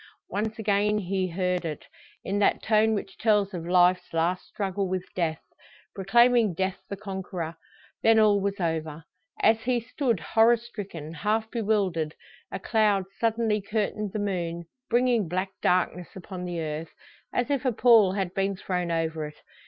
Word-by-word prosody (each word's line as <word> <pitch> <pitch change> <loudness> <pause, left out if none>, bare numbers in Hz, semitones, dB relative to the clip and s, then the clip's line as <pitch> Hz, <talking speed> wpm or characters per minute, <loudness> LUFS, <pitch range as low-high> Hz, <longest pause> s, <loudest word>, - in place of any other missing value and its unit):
Once 215 +2 -2
again 210 -1 +1
he 190 -1 -1
heard 180 0 -1
it, 155 -3 -5 0.4
in 200 +1 -1
that 205 - +2
tone 220 0 +3
which 195 -1 -6
tells 210 -3 +2
of 170 -2 -5
life's 180 0 +3
last 170 +3 0
struggle 195 -1 -2
with 185 0 -2
death 165 -3 -1 0.5
proclaiming 230 0 +4
death 190 +1 -1
the 200 - -4
conqueror. 190 -4 -5 0.5
Then 225 0 +5
all 210 -2 +5
was 200 0 -2
over. 160 -2 -2 0.4
As 220 +1 +4
he 245 0 +1
stood 235 - -1
horror 225 +6 +4
stricken, 195 -9 -8
half 215 +6 -1
bewildered, 195 -9 0 0.4
a - - -3
cloud 210 -2 +2
suddenly 225 -2 +1
curtained 210 0 -2
the - - -3
moon, 170 -4 -2 0.2
bringing 240 -4 +2
black 185 +2 -1
darkness 180 -1 0
upon 185 -1 -7
the 175 -1 -4
earth, 155 +1 -4 0.4
as 245 +3 -1
if 280 -1 0
a 255 - +2
pall 220 -4 +5
had 190 -3 -2
been 195 0 0
thrown 180 -2 -2
over 160 -2 -1
it. 150 - -12
195 Hz, 160 wpm, -27 LUFS, 180-220 Hz, 0.5 s, Then